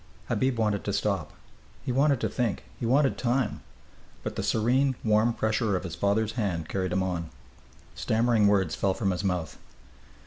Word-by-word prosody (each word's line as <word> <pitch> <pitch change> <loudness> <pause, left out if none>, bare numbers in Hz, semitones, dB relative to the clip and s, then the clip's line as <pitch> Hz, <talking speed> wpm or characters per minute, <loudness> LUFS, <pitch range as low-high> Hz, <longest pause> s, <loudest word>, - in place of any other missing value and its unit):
Habib 130 -2 +1
wanted 105 -3 0
to 100 - -1
stop. 95 -6 -1 0.5
He - - -1
wanted 140 +1 +3
to - - +1
think. 120 -5 -2 0.2
He 115 - -2
wanted 135 +3 +3
time. 125 -2 0 0.6
But - - -4
the - - -2
serene, 130 +5 +2
warm 110 +1 +3
pressure 110 -2 0
of 90 - -2
his 90 -4 -5
father's 100 +5 +1
hand 95 -9 -2
carried 95 -2 -2
him 95 +1 +1
on. 85 -3 -3 0.6
Stammering 110 -1 +2
words 95 -5 +2
fell 95 -1 0
from 100 -4 0
his 90 +2 -3
mouth. 90 -4 -2
105 Hz, 170 wpm, -27 LUFS, 95-120 Hz, 0.6 s, wanted